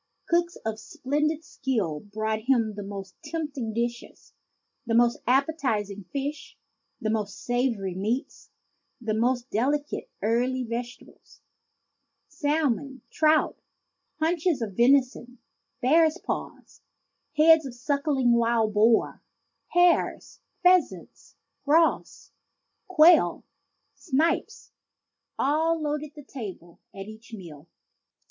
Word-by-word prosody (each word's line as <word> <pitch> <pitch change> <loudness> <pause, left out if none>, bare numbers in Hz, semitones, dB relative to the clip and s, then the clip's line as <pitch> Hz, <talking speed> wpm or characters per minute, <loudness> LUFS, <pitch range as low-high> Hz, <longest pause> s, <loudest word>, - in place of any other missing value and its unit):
Cooks 345 0 +1
of 220 -1 -3
splen 300 - -2
did 315 +1 -3
skill 220 - -2
brought 215 +2 -4
him 230 -5 +3
the 205 - -7
most 195 -1 -7
tempting 290 -8 -4
dishes. 235 +2 -5 0.5
The 230 - +1
most 235 0 +3
ap 265 +3 +4
petizing 210 - -3
fish, 285 +1 -5 0.4
the 215 - -1
most 210 -2 -2
savory 240 -6 -1
meats, 220 - -3 0.5
the 225 -3 -2
most 245 +3 0
delicate 285 +7 -1
early 250 +4 +1
vegetables, 240 +1 -8 0.9
salmon, 285 -4 -1
trout, 310 -1 +2 0.6
haunches 325 -4 +1
of 200 -4 -6
vension, 250 0 +2 0.5
bears' 315 +5 +4
paws, - - -6 0.6
heads 315 -1 +6
of 245 - -9
suckling 280 0 0
wild 230 -2 +2
boars, 220 +2 +3 0.5
hares, 350 -1 +2 0.2
pheasants, 360 0 +1 0.3
grouse, 320 +3 +1 0.6
quail, 345 -2 +5 0.5
snipe, 325 +5 0 0.9
all 320 +4 +1
loaded 300 0 -3
the 295 - -11
table 200 - -9
at 195 0 -8
each 220 +2 -13
meal. 165 -6 -12
255 Hz, 105 wpm, -26 LUFS, 220-300 Hz, 0.9 s, heads